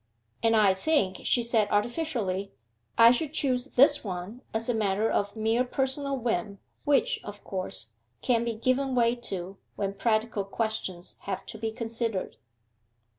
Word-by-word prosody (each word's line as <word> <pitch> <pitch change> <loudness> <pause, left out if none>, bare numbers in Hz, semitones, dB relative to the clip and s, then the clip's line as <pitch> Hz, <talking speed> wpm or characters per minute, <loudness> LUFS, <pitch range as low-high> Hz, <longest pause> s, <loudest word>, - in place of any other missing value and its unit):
'And 225 0 +3
I 205 -3 +5
think,' 190 -2 +1
she 240 - +3
said 225 -3 +2
artificially, 210 - -1 0.5
'I 230 0 +9
should 290 +4 -1
choose 255 -5 +1
this 285 +2 +5
one 190 +4 -6
as 225 +1 -2
a 245 - +1
matter 210 -1 +1
of 205 +1 0
mere 225 +3 +2
personal 270 +2 -1
whim, 210 -5 -2 0.3
which, 290 -1 +2
of 205 0 -9
course, 185 - -4 0.3
can't 235 -2 +2
be 235 -1 -2
given 255 +3 0
way 235 -1 +3
to 195 -5 -5 0.2
when 195 -1 -2
practical 215 0 0
questions 195 -4 -3
have 195 -2 -4
to 220 - -6
be 225 0 -2
considered. 225 -3 -2
225 Hz, 150 wpm, -28 LUFS, 200-250 Hz, 0.5 s, I